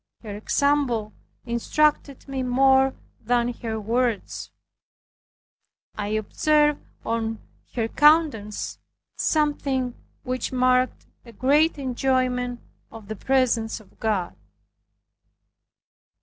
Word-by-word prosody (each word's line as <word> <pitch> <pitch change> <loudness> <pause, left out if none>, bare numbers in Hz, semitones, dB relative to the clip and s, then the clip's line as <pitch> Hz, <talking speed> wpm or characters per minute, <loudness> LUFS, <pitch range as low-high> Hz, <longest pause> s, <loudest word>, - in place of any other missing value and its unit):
Her 210 -2 -6
example 245 -2 +1 0.3
instructed 280 +4 0
me 270 -1 -3
more 265 +1 +4 0.3
than 240 +1 +1
her 220 -2 -3
words. 230 +1 -1 1.5
I 205 -1 -3
observed 295 +8 +2 0.2
on 225 -1 -1 0.4
her 230 -2 0
countenance 295 -8 +2 0.4
something 275 -5 0 0.3
which 255 0 -3
marked 255 0 +2 0.2
a 235 - -13
great 290 +8 +3
enjoyment 255 -2 0 0.3
of 220 -3 -12
the 220 - -3
presence 240 -1 +1
of 215 - -21
God. 210 -6 -1
250 Hz, 90 wpm, -24 LUFS, 225-270 Hz, 1.5 s, more